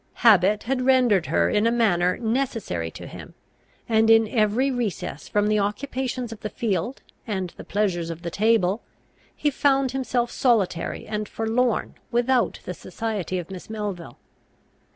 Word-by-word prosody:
Habit 205 Hz, -1 st, +6 dB
had 255 Hz, +1 st, -1 dB
rendered 250 Hz, -9 st, +3 dB
her 85 Hz, -1 st, +2 dB
in 210 Hz, +2 st, +2 dB
a -, -, +3 dB
manner 180 Hz, -7 st, +2 dB
necessary 225 Hz, -, -2 dB
to -, -, -10 dB
him, -, -, -10 dB, 0.5 s
and, 225 Hz, -1 st, +3 dB
in 225 Hz, -1 st, +6 dB
every 225 Hz, +5 st, +2 dB
recess 220 Hz, -, -3 dB
from 205 Hz, 0 st, +1 dB
the 215 Hz, 0 st, +2 dB
occupations 250 Hz, +3 st, -2 dB
of 225 Hz, -, -8 dB
the 215 Hz, -, -4 dB
field 215 Hz, +3 st, -2 dB, 0.2 s
and 190 Hz, -5 st, -2 dB
the -, -, -11 dB
pleasures 185 Hz, -5 st, -1 dB
of 165 Hz, +1 st, -7 dB
the 170 Hz, -, -4 dB
table, 210 Hz, 0 st, +2 dB, 0.5 s
he 295 Hz, -, 0 dB
found 270 Hz, -1 st, +2 dB
himself 250 Hz, -2 st, -1 dB
solitary 205 Hz, -9 st, 0 dB
and 210 Hz, -1 st, -4 dB
forlorn 225 Hz, +1 st, 0 dB, 0.2 s
without 240 Hz, +1 st, +1 dB
the -, -, -4 dB
society 210 Hz, -5 st, -4 dB
of 180 Hz, +1 st, -6 dB
Miss 185 Hz, +1 st, -9 dB
Melville. 200 Hz, -, -5 dB
220 Hz, 150 wpm, -24 LUFS, 190-245 Hz, 0.5 s, Habit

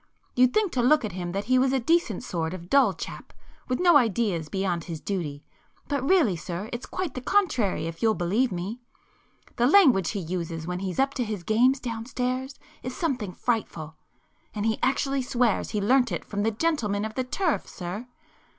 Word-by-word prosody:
You'd 250 Hz, 0 st, +5 dB
think 420 Hz, 0 st, +1 dB
to 250 Hz, -, 0 dB
look 255 Hz, +1 st, +4 dB
at 215 Hz, -, -4 dB
him 175 Hz, -1 st, -4 dB
that 200 Hz, +1 st, -1 dB
he 255 Hz, +3 st, +3 dB
was 260 Hz, 0 st, +3 dB
a 265 Hz, -, +2 dB
decent 260 Hz, -, +1 dB
sort 165 Hz, 0 st, -3 dB
of 175 Hz, 0 st, -11 dB
dull 280 Hz, -, +5 dB
chap -, -, -8 dB, 0.4 s
with 255 Hz, -, -1 dB
no 350 Hz, -4 st, +6 dB
ideas 210 Hz, -, 0 dB
beyond 185 Hz, -3 st, -1 dB
his 165 Hz, -3 st, -5 dB
duty, 155 Hz, -7 st, -4 dB, 0.4 s
but 285 Hz, -2 st, -1 dB
really 295 Hz, -, +4 dB
sir, 175 Hz, +5 st, -6 dB
it's 240 Hz, -, -5 dB
quite 370 Hz, -7 st, -3 dB
the 255 Hz, -, -5 dB
contrary, 255 Hz, -, +1 dB
if 165 Hz, 0 st, -6 dB
you'll 220 Hz, -1 st, +3 dB
believe 200 Hz, +9 st, +1 dB
me. 190 Hz, +7 st, -4 dB, 0.8 s
The 240 Hz, -, +4 dB
language 270 Hz, -, +5 dB
he 205 Hz, -, -3 dB
uses 165 Hz, -2 st, -4 dB
when 180 Hz, +1 st, -3 dB
he's 190 Hz, -1 st, -4 dB
up 270 Hz, +1 st, +2 dB
to 255 Hz, -, -1 dB
his 210 Hz, -5 st, -4 dB
games 250 Hz, +7 st, +3 dB
downstairs 255 Hz, +3 st, -3 dB, 0.3 s
is 255 Hz, +1 st, -6 dB
something 255 Hz, -, -1 dB
frightful! 175 Hz, -8 st, -2 dB, 0.6 s
And 210 Hz, 0 st, -2 dB
he 220 Hz, -1 st, +1 dB
actually 270 Hz, +1 st, +1 dB
swears 245 Hz, -3 st, +1 dB
he 210 Hz, -, -1 dB
learnt 245 Hz, +3 st, +3 dB
it 175 Hz, -, -3 dB
from 205 Hz, -, -3 dB
the 220 Hz, -, +2 dB
gentlemen 215 Hz, -5 st, 0 dB
of 220 Hz, -, -5 dB
the 260 Hz, -, -1 dB
turf, 325 Hz, +6 st, -1 dB
sir! 190 Hz, +7 st, -6 dB
225 Hz, 195 wpm, -26 LUFS, 185-260 Hz, 0.8 s, no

